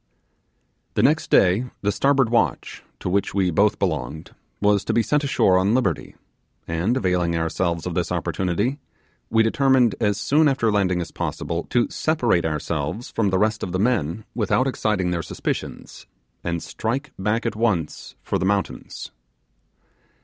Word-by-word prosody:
The - - +2
next - - +2
day 95 +8 +4 0.2
the 105 - +2
starboard 135 -1 +2
watch, 90 - 0 0.2
to - - -4
which 100 +2 0
we 95 -2 +2
both 105 +6 +3
belonged, 80 -4 -3 0.3
was 105 -1 +3
to - - 0
be 115 - +3
sent 150 +4 +1
ashore 95 -9 +3
on 100 +5 +2
liberty; 95 - -1 0.5
and, 85 +10 0
availing 90 -5 +1
ourselves 85 0 -1
of - - -3
this - - -1
opportunity, 100 - -1 0.5
we 110 0 +4
determined, 125 -1 +3
as 105 -2 +2
soon 150 +8 +3
after 130 -5 +2
landing 95 -3 +1
as 85 - -6
possible, 85 +1 -3
to 120 -1 +2
separate 120 - +1
ourselves 80 - -3
from 110 -3 +1
the 95 - +1
rest 105 +2 +1
of 90 - -4
the 95 - 0
men 105 -4 0
without 120 +3 +1
exciting 105 -8 0
their 85 -1 -1
suspicions, - - -5 0.4
and 85 -1 -2
strike 130 +7 -3
back 105 +5 0
at 115 - -1
once 100 -9 -1
for - - -1
the - - -2
mountains. 100 0 -2
100 Hz, 155 wpm, -23 LUFS, 90-115 Hz, 0.5 s, day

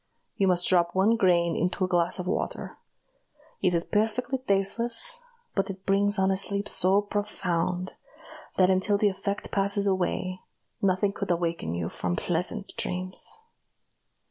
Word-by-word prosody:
You 195 - +1
must 180 -1 +3
drop 175 -1 +3
one 200 +5 +4
grain 175 -5 +2
into 180 +3 0
a - - -3
glass 175 -2 +1
of 180 - -4
water. 185 - -3 0.9
It 180 -2 +2
is 170 - +1
perfectly 235 +7 -1
tasteless, 235 - +2 0.3
but 195 - -1
it 190 0 -8
brings 200 +1 +2
on 190 0 +2
a - - +2
sleep 200 +1 +1
so 195 +1 +3
profound, 185 -3 -2 0.7
that 185 0 +5
until 190 +2 +2
the 205 0 +3
effect 200 +1 -4
passes 200 0 +2
away, 185 -1 -1 0.4
nothing 195 +1 +1
could - - -5
awaken 170 - -1
you 85 -1 -2
from 90 -1 -3
pleasant 180 - -1
dreams." 185 - -3
190 Hz, 145 wpm, -27 LUFS, 180-205 Hz, 0.9 s, that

